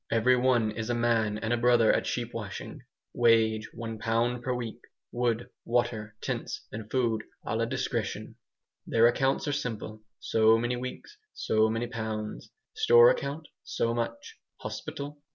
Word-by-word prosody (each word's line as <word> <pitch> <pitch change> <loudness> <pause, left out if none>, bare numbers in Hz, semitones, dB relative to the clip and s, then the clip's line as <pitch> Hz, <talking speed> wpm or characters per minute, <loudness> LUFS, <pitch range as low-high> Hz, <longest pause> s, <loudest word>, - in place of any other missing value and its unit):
Every 120 +3 +4
one 125 -3 +2
is 110 +2 -5
a 120 - +1
man 115 -3 +1
and 110 +2 -1
a - - +2
brother 120 -1 +4
at - - 0
sheep - - -3
washing. - - -6 0.3
Wage, 110 -2 +3
one 115 -2 -6
pound 115 +2 0
per 125 - -2
week; 120 -3 -4 0.3
wood, 120 -1 -1
water, 115 -3 -1
tents - - -4
and 110 0 -7
food 115 -4 0 0.2
"A - - -2
LA - - +1
DISCRETION." - - -3 0.5
Their 115 0 +4
accounts 135 +5 +2
are - - +1
simple: 110 -6 -4 0.2
so 110 0 +4
many 120 +2 -1
weeks, 130 - -7 0.2
so 110 0 +2
many 115 +2 -1
pounds; 110 -3 -5 0.2
store 470 +2 +7
account, 155 - -4 0.2
so 115 - -1
much; 115 0 -4 0.2
hospital? 145 +1 -6
115 Hz, 150 wpm, -28 LUFS, 110-125 Hz, 0.5 s, store